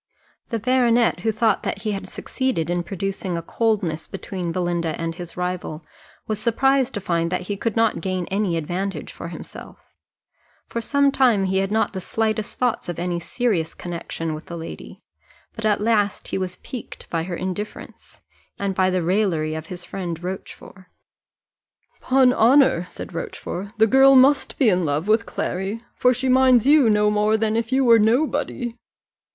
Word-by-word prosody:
The 230 - -1
baronet, 240 0 +2
who 225 - 0
thought 220 -1 +1
that - - -4
he 215 - -1
had 195 -1 -4
succeeded 250 - -2
in 175 0 0
producing 190 0 -3
a 170 - -4
coldness 195 -6 -1
between 185 -3 -5
Belinda 170 -2 -1
and 165 0 -2
his 175 0 -9
rival, 180 -3 -4 0.4
was 215 -1 -2
surprised 265 +3 +2
to - - -1
find 170 -3 -1
that 180 - -1
he 200 +3 -4
could 215 +2 -2
not 225 -1 +2
gain 185 -2 -2
any 195 -4 0
advantage 180 +5 -3
for - - -7
himself; - - -11 0.7
for 235 - -4
some 280 +4 +2
time 245 -7 +3
he 190 0 +1
had 195 +1 -1
not 220 +1 +1
the 190 - -4
slightest 215 +1 -2
thoughts 245 -7 -1
of 175 - -4
any 175 0 -2
serious 175 -4 -1
connexion 165 -2 -5
with 155 - -8
the 170 - -6
lady, 165 - -9 0.5
but 225 - -6
at 210 -1 +2
last 210 -2 +1
he - - -2
was 185 -1 -3
piqued 250 +4 -9
by 165 - 0
her 175 +1 -4
indifference, 185 +4 -7 0.4
and 200 -1 -2
by 185 0 +2
the 185 -1 0
raillery 170 -4 +1
of 160 0 -6
his 180 -1 -7
friend 175 -3 -5
Rochfort. 185 0 -8 1.1
"'Pon 255 -1 +4
honour," 240 -8 +4
said - - -8
Rochfort, 180 +3 -5
"the 220 - +6
girl 270 +4 +6
must 270 +2 +4
be 265 - +3
in 185 -4 +3
love 150 +3 -1
with 225 +2 +2
Clary, 195 +5 -3
for 250 - +3
she 255 +1 -1
minds 255 -2 +5
you 285 -4 +6
no 210 0 +3
more 210 +1 +2
than 220 0 0
if 230 +1 -1
you 265 0 +3
were 230 -1 +7
nobody." 245 +1 0
205 Hz, 175 wpm, -22 LUFS, 175-230 Hz, 1.1 s, were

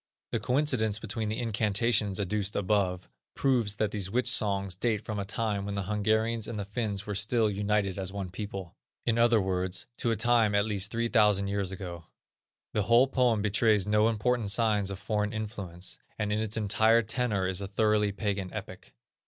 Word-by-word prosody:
The - - 0
coincidence 125 -6 +1
between 110 0 -3
the 110 - -2
incantations 105 -2 +1
adduced 100 0 -2
above, 95 -2 0 0.3
proves 120 -7 +1
that 105 -1 0
these 100 -3 -3
witch 125 +5 0
songs 100 -3 +1
date 110 +1 -1
from 105 -3 -3
a 100 - -3
time 105 -1 -2
when 100 0 -4
the 100 - -2
Hungarians 110 +3 0
and 115 -1 -5
the 100 - -3
Finns 105 -1 -3
were 105 - -3
still 105 +2 +1
united 100 -1 0
as 95 -1 -3
one 95 -3 -5
people; 95 -3 -6 0.3
in 115 -1 +1
other 120 -1 +5
words, 95 -1 -1
to 120 - 0
a 115 - +2
time 110 -1 +3
at 100 0 +3
least 100 -2 +1
3000 110 -4 +2
years 100 -2 -1
ago. 90 -3 -7 0.7
The 105 - +1
whole 115 +5 +5
poem 125 -5 +1
betrays 105 -1 +3
no 105 +1 +3
important 115 0 0
signs 105 -2 +2
of 100 - -5
foreign 105 +2 -2
influence, 95 - -5 0.2
and 105 -1 -1
in 105 - 0
its 110 0 0
entire 110 +2 +3
tenor 110 -3 -1
is 95 +1 -2
a 100 - -4
thoroughly 105 0 +2
pagan 100 -2 -3
epic. - - -9
105 Hz, 185 wpm, -29 LUFS, 100-110 Hz, 0.7 s, other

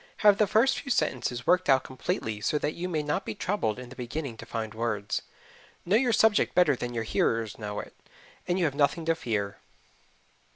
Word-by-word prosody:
Have 205 -1 +7
the 210 - +4
first 250 +7 +3
few 275 - -8
sentences 125 - 0
worked 180 -3 +3
out 135 -1 +5
completely 110 -4 -3
so 150 - +1
that 150 +1 -1
you 180 +2 -4
may 155 -3 -1
not 150 0 -1
be 110 - -5
troubled 170 - -1
in 125 -1 -8
the 130 - -11
beginning 125 +1 -5
to - - -10
find 110 -1 -4
words. 105 -2 -2 0.6
Know 190 - +3
your 245 +1 +3
subject 220 -1 +3
better 175 -6 +5
than 120 0 -5
your 115 - -1
hearers 115 0 0
know 105 -1 -4
it, - - -8 0.5
and 175 0 +1
you 180 - +2
have 145 - 0
nothing 150 +3 +1
to 165 - +3
fear. 105 - -3
135 Hz, 205 wpm, -28 LUFS, 115-180 Hz, 0.6 s, Have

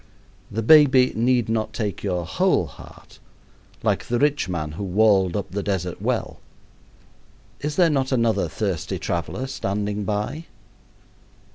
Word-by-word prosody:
The 110 +2 -3
baby 135 -2 +6
need 120 +1 +2
not 110 -1 -1
take 105 -4 -3
your 90 -4 -2
whole - - +1
heart, - - -15 0.6
like - - 0
the 120 - 0
rich 145 -5 +1
man 80 -4 -3
who 85 +7 -6
walled 95 -1 +3
up 100 -2 -5
the 100 +2 -2
desert 95 -4 -3
well. - - -2 1.2
Is 150 0 -3
there 170 -1 +4
not 135 -2 0
another 115 -3 +1
thirsty 95 -7 -3
traveler 85 +9 -3
standing 105 -5 -3
by? 105 +10 -3
105 Hz, 135 wpm, -23 LUFS, 95-130 Hz, 1.2 s, baby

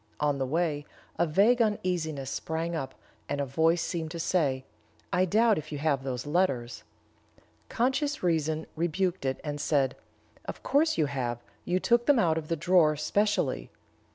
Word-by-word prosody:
On 145 -2 +1
the 130 - -1
way, 155 0 0 0.4
a 170 - +3
vague 210 +10 +4
uneasiness 170 - -1
sprang 165 +1 -3
up, 135 -5 -4 0.3
and 145 - -1
a 140 - 0
voice 160 +5 +2
seemed 165 -3 -3
to 170 +1 -6
say, 140 -7 0 0.5
'I 180 +1 +3
doubt 220 +4 +3
if 155 +1 -10
you 150 - -3
have 140 -2 +1
those 130 -1 -4
letters.' 145 -7 0 0.9
Conscious 270 +4 0
reason 160 -2 0
rebuked 175 0 -1
it, 130 0 -1
and 145 -1 -4
said, 135 -4 +1 0.5
'Of - - -7
course 310 +3 +2
you 155 - +3
have; 130 -4 -2 0.3
you 180 +1 +1
took 235 +4 +2
them 290 -2 +5
out 160 -7 +2
of 155 - -9
the 165 - 0
drawer 165 -1 +4
specially.' 175 -2 0
160 Hz, 165 wpm, -28 LUFS, 145-185 Hz, 0.9 s, them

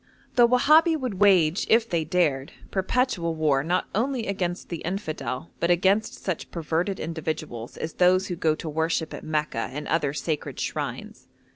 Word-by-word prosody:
The 240 -1 +7
Wahabi 310 +7 +5
would 250 -9 -4
wage, 185 -4 +4
if 230 0 +4
they 170 -5 0
dared, 150 -6 0 0.2
perpetual 190 -4 0
war 150 -4 +2
not 175 +4 0
only 245 +2 0
against 180 -3 -3
the 170 - -3
infidel, 165 -6 -4
but 170 - 0
against 195 +5 +2
such 185 -4 -3
perverted 170 +4 -2
individuals 155 -7 -5
as 160 - -4
those 185 +1 +4
who 180 - -3
go 160 -2 +1
to 160 - -7
worship 160 +1 -1
at - - -7
Mecca 150 -6 -2
and 150 +3 -6
other 150 -4 +1
sacred 155 0 -3
shrines. - - -5
170 Hz, 160 wpm, -25 LUFS, 155-200 Hz, 0.2 s, The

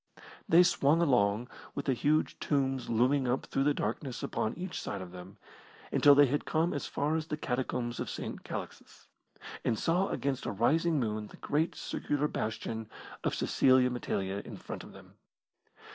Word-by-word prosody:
They 170 +2 +8
swung 160 -3 +3
along, 120 -7 +2 0.3
with 140 - -3
the 135 - +2
huge 150 +5 +1
tombs 135 -3 0
looming 125 +4 +2
up 125 +2 0
through 135 - 0
the 145 - +4
darkness 120 +4 -3
upon 110 - -2
each 180 0 -4
side 100 - -4
of 90 -2 -8
them, 90 +3 -11 0.5
until 145 -1 +6
they 145 0 +7
had 145 +2 0
come 165 +2 +1
as 145 - -3
far 150 +2 0
as 160 -1 -2
the 150 - -3
Catacombs 125 -3 -2
of - - -3
St. - - -5
Calixtus, - - -8 0.5
and 110 - +1
saw 180 - +1
against 135 -2 -2
a - - -1
rising 155 - +2
moon 110 -3 -2
the - - -14
great 155 +3 0
circular 145 0 -1
bastion 110 -2 -4 0.3
of - - 0
Cecilia 130 -1 +4
Metella 100 -5 -2
in - - -9
front - - -7
of - - -12
them. - - -15
135 Hz, 175 wpm, -31 LUFS, 115-150 Hz, 0.5 s, They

